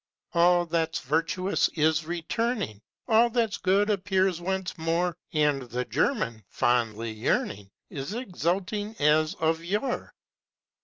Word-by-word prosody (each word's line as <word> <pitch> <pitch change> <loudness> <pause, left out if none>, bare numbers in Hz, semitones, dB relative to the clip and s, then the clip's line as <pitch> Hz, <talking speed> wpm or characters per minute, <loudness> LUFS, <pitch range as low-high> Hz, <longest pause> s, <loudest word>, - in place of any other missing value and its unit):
All 175 0 +4
that's 165 -1 0
virtuous 165 +7 +1
is 155 0 +2
returning, 175 - -2 0.3
All 235 0 +5
that's 230 -3 0
good 200 +3 +2
appears 190 -3 +1
once 190 0 -2
more 170 +1 0 0.2
And 150 -4 +2
the 125 0 -4
German, 115 - 0
fondly 115 -2 0
yearning, 105 -2 -1 0.2
Is 135 +4 -5
exulting 205 -1 -2
as 155 +3 +3
of 160 -1 0
yore. 210 +9 -2
170 Hz, 115 wpm, -27 LUFS, 150-195 Hz, 0.3 s, All